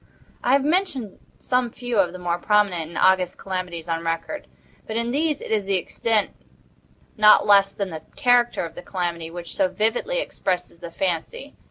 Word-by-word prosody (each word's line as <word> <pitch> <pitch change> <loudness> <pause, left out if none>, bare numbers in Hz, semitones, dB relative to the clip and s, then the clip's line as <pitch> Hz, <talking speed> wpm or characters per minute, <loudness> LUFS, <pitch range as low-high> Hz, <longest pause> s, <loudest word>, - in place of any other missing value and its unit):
I 250 - +3
have 275 0 +3
mentioned 300 - -1 0.2
some 250 -1 0
few 240 -1 -3
of 180 -3 +3
the 185 - -8
more 175 -1 -2
prominent 200 -5 +2
and 170 - -8
august 185 -1 +3
calamities 180 -3 -5
on 165 0 -2
record; 165 - -3 0.4
but 220 - -3
in 235 +1 -1
these 300 +2 0
it - - -7
is 210 -3 +1
the 195 0 +1
extent, 210 +3 0 0.9
not 215 0 +7
less 200 -1 +5
than 195 -3 -4
the 160 -1 -6
character 245 -7 +3
of 165 - -9
the - - -9
calamity, 175 -3 -3
which 170 0 -7
so 290 - +3
vividly 245 - 0
impresses 180 - -3
the 170 -1 -7
fancy. 180 - -3
200 Hz, 180 wpm, -23 LUFS, 175-245 Hz, 0.9 s, not